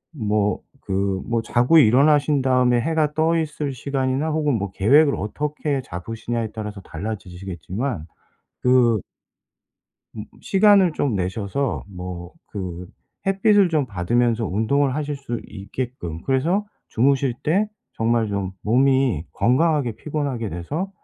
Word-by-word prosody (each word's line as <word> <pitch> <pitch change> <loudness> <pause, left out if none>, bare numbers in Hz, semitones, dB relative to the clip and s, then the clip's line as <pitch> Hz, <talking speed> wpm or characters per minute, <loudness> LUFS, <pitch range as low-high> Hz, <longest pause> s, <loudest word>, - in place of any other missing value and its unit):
뭐 105 -4 0 0.2
그 95 -1 -1
뭐 115 -1 0
자고 125 +8 +3
일어나신 145 +3 +4
다음에 125 -2 +3
해가 155 0 0
떠 160 +2 +2
있을 150 -3 -2
시간이나 135 +3 -1
혹은 150 -4 +1
뭐 100 -3 -3
계획을 140 +10 +4
어떻게 145 +4 -2
잡으시냐에 115 +5 -4
따라서 105 -2 -6
달라지시겠지만 95 - -5 0.5
그 125 -4 +3 1.1
음 105 - -5 0.2
시간을 195 -4 +4
좀 135 -8 0
내셔서 100 +8 -2
뭐 90 -1 -7 0.2
그 90 -3 -6 0.4
햇빛을 195 -1 +4
좀 150 -4 +1
받으면서 115 +3 0
운동을 130 +7 +1
하실 150 -1 -2
수 135 -4 -5
있게끔 100 -5 -6
그래서 165 +10 +1 0.2
주무실 135 +1 +2
때 195 +8 +2 0.3
정말 115 -1 +1
좀 100 -2 -2
몸이 130 - +2
건강하게 135 -1 +2
피곤하게 140 -8 -3
돼서 145 - -4
125 Hz, 270 characters per minute, -22 LUFS, 105-145 Hz, 1.1 s, 일어나신